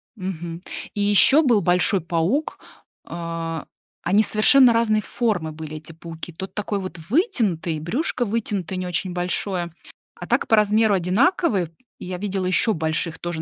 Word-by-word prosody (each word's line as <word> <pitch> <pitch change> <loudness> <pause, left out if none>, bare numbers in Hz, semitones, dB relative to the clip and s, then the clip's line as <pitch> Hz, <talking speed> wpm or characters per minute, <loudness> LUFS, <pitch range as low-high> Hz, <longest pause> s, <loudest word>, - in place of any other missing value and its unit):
мгм. 175 -4 -6 0.3
И 205 - -2
ещё 205 +9 +5
был 235 -7 +3
большой 180 +3 +2
паук, 170 - -1 0.5
а, 165 -1 -5 0.4
они 200 +5 +3
совершенно 245 +5 +6
разной 225 -2 +2
формы 200 -10 -1
были, 155 0 -8
эти 155 +1 -10
пауки. 165 +1 -8
Тот 190 +4 -8
такой 205 -1 -2
вот 185 -2 -7
вытянутый, 220 - +1
и 155 - -5
брюшко 245 - -1
вытянутое, 205 -5 -2
не 180 - -3
очень 180 +1 -2
большое, 175 -1 -2 0.4
а - - -8
так - - +1
по 225 - +5
размеру 215 0 +3
одинаковые. 195 - +1 0.3
И - - -8
я 180 0 -4
видела 195 -1 -3
ещё 210 +4 +3
больших 160 +1 -2
тоже, 175 -2 -4
185 Hz, 155 wpm, -22 LUFS, 170-215 Hz, 0.5 s, совершенно